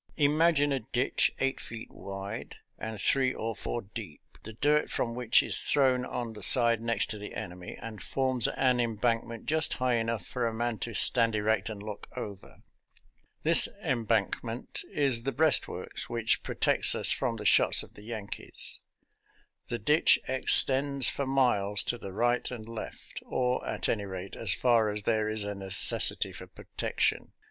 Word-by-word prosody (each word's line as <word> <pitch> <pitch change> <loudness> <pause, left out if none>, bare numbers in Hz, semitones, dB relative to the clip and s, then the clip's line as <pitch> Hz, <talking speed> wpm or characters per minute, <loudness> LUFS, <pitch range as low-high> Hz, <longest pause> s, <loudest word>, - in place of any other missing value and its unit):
Imagine 150 0 +2
a 135 - -1
ditch 120 +2 0
eight 135 0 -1
feet 115 -1 -9
wide 100 +2 -8 0.2
and 110 -1 -6
three 130 +4 +1
or 115 0 -4
four 120 - -5
deep, 100 -6 -10 0.2
the 110 - -10
dirt 150 +6 +1
from 115 - -2
which 120 -1 +2
is - - +4
thrown 130 -3 +1
on 120 -3 -5
the 105 - -11
side 115 +2 +7
next 115 0 -1
to 105 - -6
the 105 - -9
enemy 90 0 -8
and 110 -2 -9
forms 130 -3 -1
an 125 -2 0
embankment 115 0 -2
just 155 +1 +2
high 125 -2 0
enough 115 -4 -3
for 120 -2 -3
a 115 - -4
man 120 -1 -3
to 115 -2 -5
stand 115 -1 +4
erect 110 +2 -1
and 105 -2 -8
look 105 -1 -8
over. 100 -2 -9 0.8
This - - +7 0.2
embankment 115 0 -2
is 135 -5 0
the 135 +3 -3
breastworks 155 -2 -1
which 115 -1 +1
protects - - +2
us - - +4
from 125 -3 0
the 105 -1 -8
shots - - +5
of - - -15
the - - -15
Yankees. 110 -2 -4 0.9
The 120 - -4
ditch 150 +9 +3
extends 135 0 +3
for 140 - -4
miles 115 -7 +2
to 120 - -3
the 100 - -8
right 120 +5 -1
and 115 -3 -9
left, 115 -1 -9
or, 125 0 -2
at - - -3
any 105 -3 -2
rate, 95 0 -8
as - - -4
far 115 -4 +2
as 105 0 0
there 110 0 0
is 110 -1 0
a 105 0 -4
necessity 95 -1 +4
for - - -11
protection. - - -3
115 Hz, 170 wpm, -28 LUFS, 105-130 Hz, 0.9 s, side